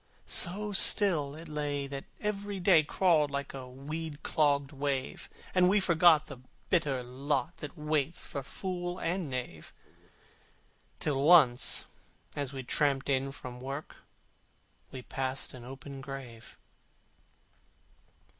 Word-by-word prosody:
So 205 +4 +4
still 175 -8 +4
it 165 +2 -9
lay 145 -2 -2
that 140 0 -6 0.2
every 205 -1 -3
day 175 -3 +5
Crawled 155 -1 +2
like 140 0 -4
a 130 -2 -8
weed 150 +4 -7
clogged 145 -3 +1
wave: 140 -2 -3 0.2
And 180 -1 +4
we 205 +2 +4
forgot 170 -4 +5
the 135 -3 -10 0.3
bitter 145 -8 +1
lot 140 +6 -2
That 150 +2 -8
waits 150 +1 -1
for 140 - -5
fool 175 +4 -5
and 175 -3 -2
knave, 125 -12 -6 1.3
Till 140 -3 -1
once, 140 -6 +4 0.2
as 140 -3 -2
we 135 -2 -6
tramped 140 +1 0
in 135 0 0
from 125 -2 -9
work, 135 +3 -6 0.9
We 130 -1 -8
passed 135 +2 -3
an 125 -2 -10
open 135 +2 -9
grave. 135 -5 -9
145 Hz, 125 wpm, -30 LUFS, 135-170 Hz, 1.3 s, day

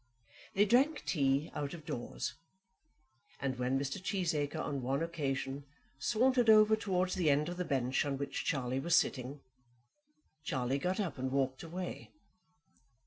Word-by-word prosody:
They 205 +2 +5
drank 265 +8 +3
tea 140 -1 +1
out 145 +2 -3
of 155 -3 -12
doors, 120 -4 -4 1.1
and 130 -2 -2
when 125 +2 +1
Mr. 140 +7 -3
Cheesacre 170 -7 -1
on 140 -2 -2
one 135 +5 0
occasion 140 -4 -3 0.4
sauntered 245 0 +3
across 215 0 +7
towards 185 -2 0
the 175 -5 +2
end 150 +3 +2
of 175 - -5
the 180 - -2
bench 130 -3 +1
on 140 -1 -2
which 140 +1 -3
Charlie 130 -3 -1
was 170 +5 +2
sitting, 135 0 0 1.0
Charlie 130 -2 -1
got 180 +7 -1
up 175 -10 -2
and 130 +1 -1
walked 130 -1 0
away. 175 +2 -6
145 Hz, 145 wpm, -33 LUFS, 135-185 Hz, 1.1 s, across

